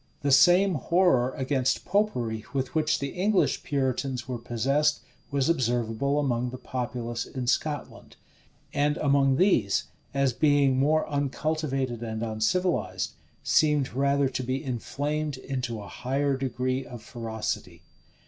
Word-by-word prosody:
The 140 - +2
same 180 +7 +6
horror 150 -5 +2
against 130 -1 0
Popery 125 - 0
with 130 -2 -1
which 155 -1 +2
the 140 - -3
English 190 +5 +1
Puritans 130 -3 -2
were 125 -2 -4
possessed, 135 +6 +1 0.3
was 140 -2 +1
observable 125 -2 0
among 125 -3 0
the 130 - -7
populace 120 -2 -4
in 130 -2 -5
Scotland; 145 +4 -2 0.6
and 145 +1 +1
among 140 -2 +3
these, 130 - +3 0.3
as 140 -2 +1
being 140 -1 +3
more 155 +3 +2
uncultivated 140 -3 -1
and 110 -1 -4
uncivilized, 115 +12 0 0.3
seemed 150 -5 +2
rather 140 +1 +2
to 130 0 -3
be 130 +3 -2
inflamed 145 +3 -3
into 125 -4 -4
a 100 - -9
higher 135 +5 -1
degree 130 0 -2
of 120 -3 -10
ferocity. 110 -3 -5
135 Hz, 130 wpm, -27 LUFS, 125-145 Hz, 0.6 s, same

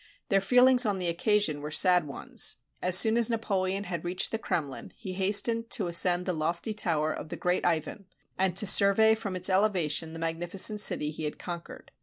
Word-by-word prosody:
Their 195 -1 +2
feelings 250 +4 +4
on 205 -4 -1
the 180 -2 -2
occasion 170 -4 0
were 150 - -6
sad 180 0 +3
ones. 140 - -2 0.3
As 180 0 +4
soon 220 +3 +5
as 235 -1 +2
Napoleon 195 -4 -2
had 175 -4 -6
reached 180 +1 -2
the 225 - -3
Krem 155 -8 -3
lin, 135 - -10
he 190 -5 -8
hastened 210 +4 +1
to 200 - 0
ascend 175 +1 +2
the 185 - -2
lofty 170 +6 -3
tower 155 -6 -1
of - - -9
the - - -7
great 180 0 -1
Ivan, 175 +3 -3 0.3
and 185 -1 -1
to 210 - +3
survey 200 +3 +4
from 215 -4 -5
its 180 0 -1
elevation 180 -5 0
the - - -8
magnificent 175 +6 0
city 150 -6 +1
he 155 0 -7
had 150 - -5
conquered. 170 -1 -9
185 Hz, 200 wpm, -27 LUFS, 170-210 Hz, 0.3 s, soon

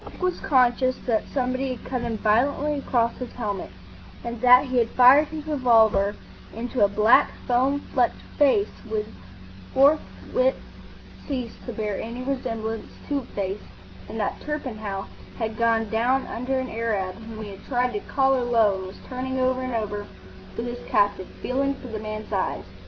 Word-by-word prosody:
Dick - - -12
was 365 -1 0
conscious 255 -1 +3
that 225 -3 0
somebody 255 0 -1
had 230 - -14
cut 255 -2 -2
him 235 -2 -2
violently 270 +8 +2
across 235 -3 +1
his 250 -2 -6
helmet, 205 -5 -4 0.5
that 245 +3 +5
he 255 -1 -2
had 230 -2 +3
fired 265 +5 +7
his 310 -1 -7
revolver 225 -8 +3 0.4
into 240 0 0
a - - +7
black, 210 +3 +5 0.2
foam 265 +3 +2
flecked - - +2 0.2
face 310 +8 +3 0.2
which 215 -1 -1 0.7
forthwith 310 - +2 0.7
ceased 250 -5 -4
to - - -3
bear 210 -3 -3
any 235 +3 -6
resemblance 225 -4 -3 0.2
to 285 -1 +1
a 260 - -9
face, 195 0 -2 0.5
and 220 - -5
that 205 - -2
Torpenhow 220 -10 -4 0.3
had 220 -2 -2
gone 225 -1 +2
down 245 +4 +2
under 255 +3 -2
an 260 0 -2
Arab 215 -5 -1
whom 220 -1 -8
he 205 - -7
had 195 - -12
tried 250 -1 0
to 205 - -1
"collar 265 +2 +1
low," 225 -5 +3
and 190 - -6
was 190 - -10
turning 260 +1 -3
over 255 0 +1
and 255 -2 -3
over 205 -2 -3 0.5
with 230 - -2
his 240 0 -6
captive, 200 -2 +2 0.2
feeling 275 +2 0
for 255 - -10
the 220 -1 -4
man's 215 0 -6
eyes. 195 - -1
240 Hz, 170 wpm, -25 LUFS, 220-260 Hz, 0.7 s, fired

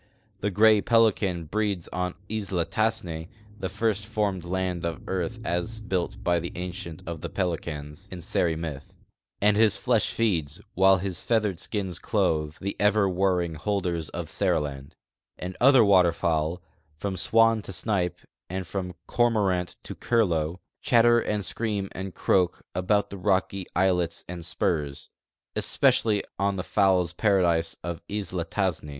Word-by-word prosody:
The 105 - 0
gray 105 +2 +5
pelican 105 -7 +2
breeds 100 0 -1
on 90 0 -2
Isla 100 -5 -2
Tassne 85 -7 -1
— 105 0 -23
the 95 - -3
first 105 +1 0
formed 105 -4 -1
land 90 -1 -2
of 85 -1 -3
earth 95 +4 -2
as 90 +6 -2
built 95 -5 -3
by 85 -1 +2
the 85 +1 -5
Ancient 90 -2 -6
of 85 -2 -5
Pelicans, 85 -2 -3
in 90 - -7
Seri 85 0 0
myth, 75 -4 -6 0.2
— - - -49
and 105 0 +5
his 110 -1 +4
flesh 120 -5 +2
feeds, 85 -11 0
while 95 +1 +5
his 95 -1 -3
feathered 105 -6 +1
skins 95 -4 -3
clothe, 75 -1 0
the 100 +1 -3
ever 105 0 +4
warring 90 -2 +1
holders 85 -2 -2
of - - -5
Seriland; 70 -3 -1 0.4
and 90 +1 -6
other 130 -3 +7
water 90 -4 +5
fowl, 85 +1 -1 0.3
from 95 +4 -3
swan 115 +4 +4
to 100 - -8
snipe 95 -3 -1 0.3
and 95 +1 -3
from 90 0 -4
cormorant 100 -7 +1
to - - -6
curlew, 85 -9 +1 0.3
chatter 120 -3 +5
and 105 -3 -1
scream 105 -4 -1
and 95 -1 -6
croak 90 -2 +1
about 100 +3 +1
the 100 - -7
rocky 95 -1 0
islets 90 -2 +1
and 90 -1 -6
si)urs, 75 -3 -2 0.5
especially 105 -3 +2 0.2
on 100 0 +1
the 90 - -3
fowls' 95 -4 +2
paradise 85 -5 +2
of 85 0 -4
Isla 95 -4 -3
Tassne. 85 -4 -1
95 Hz, 150 wpm, -26 LUFS, 85-105 Hz, 0.5 s, other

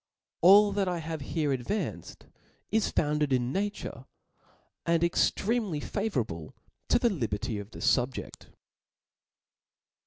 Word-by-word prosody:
All 200 +4 +7
that 195 -1 0
I 180 -1 -1
have 160 -1 -5
here 150 +1 -1
advanced, 135 - -4 0.5
is 220 -1 +2
founded 150 -1 0
141 130 +11 +1
rtature, 205 - -9 0.8
and 170 0 +3
extremely 195 +1 +1
favourable 120 - -3 0.3
to - - +5
the 240 -1 +2
liberty 110 - -2
of 100 0 -8
thefubjeft. 125 +3 -1
160 Hz, 105 wpm, -29 LUFS, 130-200 Hz, 0.8 s, All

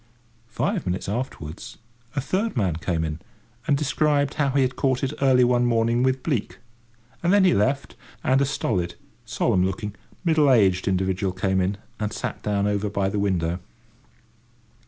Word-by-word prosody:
Five 115 - -2
minutes 90 +1 -2
afterwards, 105 - -5 0.4
a 140 - 0
third 190 - -1
man 95 -8 +1
came 85 -2 -1
in, 80 0 -4 0.5
and 145 -3 +3
described 145 -1 +1
how 145 -2 +1
he 135 0 +2
had 130 0 -1
caught 130 -2 0
it 135 +2 -1
early 130 -2 +5
one 120 0 +3
morning, 115 0 +2
with 130 0 +1
bleak; 135 -10 -2 0.6
and 175 - +2
then 200 -1 +5
he 185 - +5
left, 135 +7 0 0.3
and 130 +1 +3
a - - +4
stolid, 95 -10 -1 0.3
solemn 115 -5 +1
looking, 100 +2 -2 0.3
middle 155 -4 +4
aged 95 -6 +3
individual 95 0 0
came 95 0 0
in, 95 +2 -1 0.2
and 105 -1 -2
sat - - -4
down 100 -1 0
over 105 0 0
by 100 -1 0
the 100 - -2
window. 90 -3 0
115 Hz, 165 wpm, -24 LUFS, 95-135 Hz, 0.6 s, early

